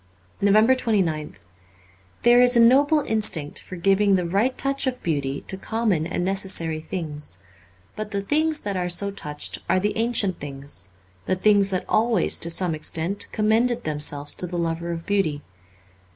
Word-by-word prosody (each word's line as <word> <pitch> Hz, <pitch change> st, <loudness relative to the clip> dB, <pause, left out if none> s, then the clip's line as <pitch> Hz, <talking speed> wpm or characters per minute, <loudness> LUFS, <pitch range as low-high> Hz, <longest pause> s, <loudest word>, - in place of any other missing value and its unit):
368 215 Hz, +2 st, +3 dB
NOVEMBER 155 Hz, -2 st, -2 dB
29th 95 Hz, -, -20 dB, 0.8 s
THERE 240 Hz, +1 st, +6 dB
is 250 Hz, 0 st, +4 dB
a -, -, +5 dB
noble 280 Hz, +6 st, +5 dB
instinct 205 Hz, -, -2 dB
for 185 Hz, -, -10 dB
giving 195 Hz, +3 st, +2 dB
the 180 Hz, -2 st, 0 dB
right 205 Hz, +9 st, 0 dB
touch 275 Hz, 0 st, -1 dB
of 250 Hz, -1 st, -3 dB
beauty 140 Hz, -4 st, -2 dB
to 190 Hz, -, -2 dB
common 210 Hz, -8 st, -1 dB
and 175 Hz, 0 st, -2 dB
necessary 190 Hz, -5 st, +1 dB
things, 150 Hz, -, -6 dB, 0.6 s
but 215 Hz, -1 st, -5 dB
the 200 Hz, -1 st, -3 dB
things 310 Hz, +6 st, +1 dB
that 200 Hz, -1 st, -4 dB
are 180 Hz, -1 st, -2 dB
so 200 Hz, +3 st, +1 dB
touched 150 Hz, -6 st, -4 dB
are 185 Hz, +2 st, +3 dB
the 205 Hz, +2 st, -1 dB
ancient 225 Hz, -5 st, 0 dB
things, 135 Hz, -11 st, -5 dB, 0.4 s
the 185 Hz, -, +1 dB
things 200 Hz, +1 st, +3 dB
that 185 Hz, -2 st, -2 dB
always, 220 Hz, -3 st, +2 dB
to 170 Hz, -, +1 dB
some 170 Hz, 0 st, +1 dB
extent, 160 Hz, +5 st, 0 dB
commended 225 Hz, +3 st, +1 dB
themselves 145 Hz, -1 st, +1 dB
to 180 Hz, -, -4 dB
the 175 Hz, 0 st, -5 dB
lover 170 Hz, 0 st, -2 dB
of 165 Hz, -1 st, -6 dB
beauty. 160 Hz, -8 st, -1 dB
190 Hz, 165 wpm, -23 LUFS, 165-220 Hz, 0.8 s, THERE